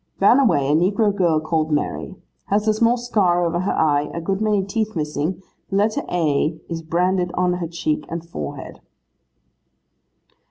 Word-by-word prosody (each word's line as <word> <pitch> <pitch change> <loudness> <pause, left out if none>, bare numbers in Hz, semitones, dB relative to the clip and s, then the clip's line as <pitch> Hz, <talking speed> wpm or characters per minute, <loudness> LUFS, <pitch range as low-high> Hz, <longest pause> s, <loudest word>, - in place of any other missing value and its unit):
'Ran 220 +7 +6
away, 145 - +3
a 145 - +2
negro 200 +5 +2
girl 170 -5 +2
called 155 0 -1
Mary. 145 0 -2 0.3
Has 210 +2 0
a 215 - +4
small 230 +3 +2
scar 190 -8 +1
over 170 +1 0
her 185 - -1
eye, 150 -1 +1
a - - -2
good 195 +4 -2
many 210 -2 +2
teeth 215 +2 -2
missing, 155 +4 -2 0.3
the 195 - -3
letter 210 +2 +1
A 160 -1 0
is 165 -1 -4
branded 180 +2 0
on 180 0 +1
her 175 -1 -3
cheek 155 -2 -2
and 170 0 -5
forehead. 75 - -7
175 Hz, 165 wpm, -21 LUFS, 160-200 Hz, 0.3 s, Ran